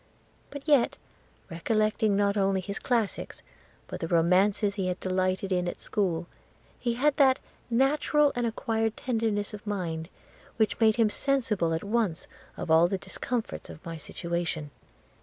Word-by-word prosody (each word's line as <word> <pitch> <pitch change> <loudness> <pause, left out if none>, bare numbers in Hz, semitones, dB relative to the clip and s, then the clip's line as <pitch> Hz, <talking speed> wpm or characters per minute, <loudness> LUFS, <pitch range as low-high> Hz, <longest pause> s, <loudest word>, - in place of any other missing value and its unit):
But 285 +1 -9
yet, 285 -6 +4 0.5
recollecting 215 +4 +1
not 200 0 +2
only 195 -1 +2
his 200 +2 -4
classics, 230 -5 -1 0.4
but - - -7
the 165 - -3
romances 185 +5 +3
he 195 -2 -2
had 180 0 -2
delighted 185 +1 -1
in 180 -1 +1
at - - -4
school, 180 -5 -1 0.5
he 240 -1 -1
had 280 +3 +2
that 265 -2 +5 0.3
natural 285 +4 +3
and 240 -1 0
acquired 225 -1 -1
tenderness 220 -5 -1
of 210 0 -9
mind 170 -5 -3 0.5
which 220 -1 +1
made 220 -2 +5
him 225 -3 +3
sensible 230 -13 0
at 160 0 -1
once 205 -5 0 0.3
of 160 - -3
all 165 +2 +6
the 195 - -1
discomforts 240 +4 -4
of 155 - -11
my 165 -1 -5
situation. 170 -2 -3
205 Hz, 150 wpm, -28 LUFS, 180-230 Hz, 0.5 s, all